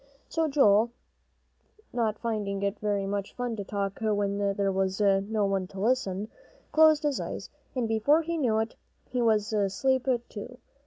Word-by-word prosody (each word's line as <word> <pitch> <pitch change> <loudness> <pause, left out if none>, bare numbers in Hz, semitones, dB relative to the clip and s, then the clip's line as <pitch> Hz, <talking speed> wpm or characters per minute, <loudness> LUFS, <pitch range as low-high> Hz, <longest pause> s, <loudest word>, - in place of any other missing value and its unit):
So 325 -1 +1
Joel, 230 -6 +4 1.0
not 225 -3 0
finding 205 -4 -2
it 200 +1 -1
very 205 -2 0
much 200 0 -3
fun 245 -2 -2
to 200 - -3
talk 200 -1 -3
when 205 -2 0 0.2
there 195 -1 +1
was 190 0 0
no 200 +1 +2
one 195 -2 0
to 195 - -10
listen, 210 -3 0 0.4
closed 310 -1 +5
his 290 -2 0
eyes, - - -5 0.2
and 245 -3 0
before 255 +9 +3
he 335 +1 -2
knew 235 -6 +2
it, 220 +1 -1 0.4
he 250 -1 0
was 220 -2 +2
asleep 215 +6 +1 0.2
too. 240 +4 -8
215 Hz, 160 wpm, -28 LUFS, 200-245 Hz, 1.0 s, closed